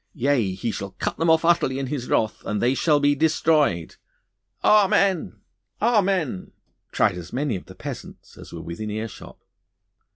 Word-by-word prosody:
Yea, 125 -8 +1
He 115 +4 -3
shall 100 -1 -6
cut - - -2
them 165 0 +2
off 160 0 +4
utterly 170 -6 +2
in 135 - -2
His 130 -2 -4
wrath, 110 - 0
and 105 - -2
they 120 +4 +2
shall 150 +2 +2
be 145 0 +3
destroyed.' 150 - +1 0.7
'Amen! 200 - +3 0.4
Amen!' 195 - +1 0.4
cried 90 - +1
as 85 - -10
many 135 -2 -1
of 90 - -8
the - - -12
peasants - - -9
as - - -12
were 85 -1 -8
within 85 +6 -6
earshot. 110 +1 -7
135 Hz, 160 wpm, -23 LUFS, 105-165 Hz, 0.7 s, off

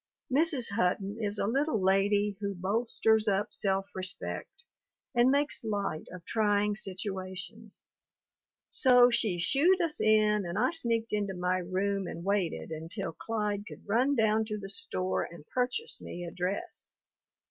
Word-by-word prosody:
Mrs. 285 -6 +1
Hutton 200 +1 0
is 205 -1 0
a - - 0
little 265 +2 +1
lady 200 +2 +2
who 200 -1 -3
bolsters 220 +3 +1
up 205 +1 0
self 195 0 0
respect 185 - -4 0.5
and 240 0 +4
makes 285 0 +1
light 205 -7 -2
of 180 -2 -10
trying 210 -1 +1
situations, 190 +2 -5 0.8
so 250 -2 +6
she 215 -6 +1
"shooed" 290 - +3
us 330 -4 +1
in 215 -1 +4
and 175 +1 -4
I 250 +7 +2
sneaked 230 -9 +1
into 200 -2 -1
my 180 +1 0
room 190 +2 -1
and 170 - -6
waited 195 -5 -1
until 165 +3 -5
Clyde 210 +2 -3
could - - -12
run 250 +7 +2
down 220 -2 +3
to 215 -1 -3
the 195 -1 -7
store 185 -1 -2
and 170 -3 -8
purchase 255 - 0
me 175 0 -7
a 170 - -6
dress. 190 - -4
205 Hz, 145 wpm, -30 LUFS, 190-230 Hz, 0.8 s, so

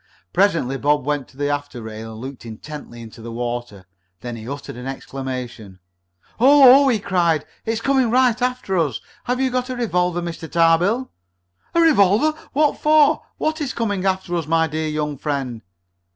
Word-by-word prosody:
Presently 165 -9 +1
Bob 145 -1 +1
went 145 -3 -1
to 135 - -21
the 145 0 -1
after 145 -3 -4
rail 110 0 -8
and 110 - -10
looked 135 -1 -8
intently 120 +2 -9
into 115 0 -12
the 115 +1 -7
water. 120 -4 -5 0.4
Then 120 -1 -5
he 115 +1 -8
uttered 140 -3 -7
an 125 +2 -7
exclamation. 130 -7 -6 0.6
"Oh! 275 +1 +8
Oh!" - - +3
he 245 -4 +3
cried. 170 -6 +1 0.2
"It's 225 0 -1
coming 265 -3 +2
right 245 0 +3
after 250 -7 -1
us! 145 -8 0 0.3
Have 250 +1 -1
you 260 -1 0
a 255 0 -1
revolver, 180 -7 0
Mr. 165 -2 -6
Tarbill?" 175 +9 +2 0.6
"A - - +4
revolver? 295 - +4 0.2
What 300 +1 +1
for? 305 -1 +4 0.2
What 315 0 -1
is 280 -3 -3
coming 205 -5 -1
after 190 -2 -1
us, 165 -3 -2
my 165 0 +3
dear 155 0 -3
young 150 -2 -3
friend?" 135 -6 -3
165 Hz, 170 wpm, -21 LUFS, -, 0.6 s, Oh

